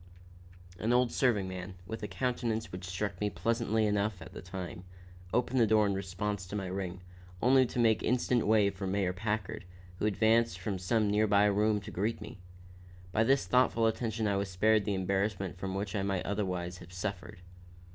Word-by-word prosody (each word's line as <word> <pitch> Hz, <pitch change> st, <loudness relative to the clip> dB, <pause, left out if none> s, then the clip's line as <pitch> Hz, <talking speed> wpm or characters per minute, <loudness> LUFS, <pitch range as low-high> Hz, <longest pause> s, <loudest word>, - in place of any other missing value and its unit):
An 110 Hz, +6 st, +1 dB
old 125 Hz, -1 st, +3 dB
serving 110 Hz, -7 st, +2 dB
man, 95 Hz, 0 st, -6 dB
with 110 Hz, +4 st, -6 dB
a 105 Hz, -, -3 dB
countenance 115 Hz, +2 st, -2 dB
which 90 Hz, 0 st, -7 dB
struck 95 Hz, +1 st, -3 dB
me 105 Hz, -, +1 dB
pleasantly 110 Hz, +3 st, 0 dB
enough 105 Hz, -1 st, 0 dB
at 90 Hz, +2 st, -11 dB
the -, -, -8 dB
time, 90 Hz, -1 st, -7 dB, 0.5 s
opened 125 Hz, +1 st, +1 dB
the 115 Hz, -, +5 dB
door 110 Hz, 0 st, +4 dB
in 100 Hz, -, +1 dB
response 95 Hz, 0 st, -3 dB
to 100 Hz, -, -6 dB
my 100 Hz, -2 st, -2 dB
ring, 95 Hz, -1 st, -4 dB, 0.4 s
only 130 Hz, +3 st, +5 dB
to -, -, -7 dB
make 115 Hz, -2 st, +3 dB
instant 125 Hz, -1 st, +1 dB
way 105 Hz, -2 st, +4 dB
for 95 Hz, 0 st, -5 dB
Mayor 95 Hz, -1 st, 0 dB
Packard, 105 Hz, 0 st, -3 dB, 0.4 s
who 105 Hz, -, +1 dB
advanced 110 Hz, 0 st, +3 dB
from 95 Hz, +1 st, -3 dB
some 105 Hz, +4 st, +1 dB
near 105 Hz, +1 st, +2 dB
by 100 Hz, 0 st, +4 dB
room 105 Hz, +1 st, +2 dB
to 105 Hz, +1 st, -9 dB
greet 105 Hz, +5 st, -1 dB
me. 125 Hz, -, -9 dB, 0.7 s
By 110 Hz, -, +3 dB
this 135 Hz, +4 st, +3 dB
thoughtful 125 Hz, -2 st, +3 dB
attention 110 Hz, 0 st, 0 dB
I 100 Hz, -1 st, +1 dB
was 100 Hz, 0 st, -2 dB
spared 105 Hz, +3 st, +3 dB
the 105 Hz, -, 0 dB
embarrassment 95 Hz, -1 st, -1 dB
from 95 Hz, +1 st, -3 dB
which 100 Hz, +2 st, -3 dB
I 100 Hz, -, 0 dB
might 95 Hz, -2 st, -1 dB
otherwise 90 Hz, -3 st, -2 dB
have 85 Hz, -, -13 dB
suffered. 90 Hz, -1 st, -5 dB
105 Hz, 190 wpm, -31 LUFS, 95-110 Hz, 0.7 s, the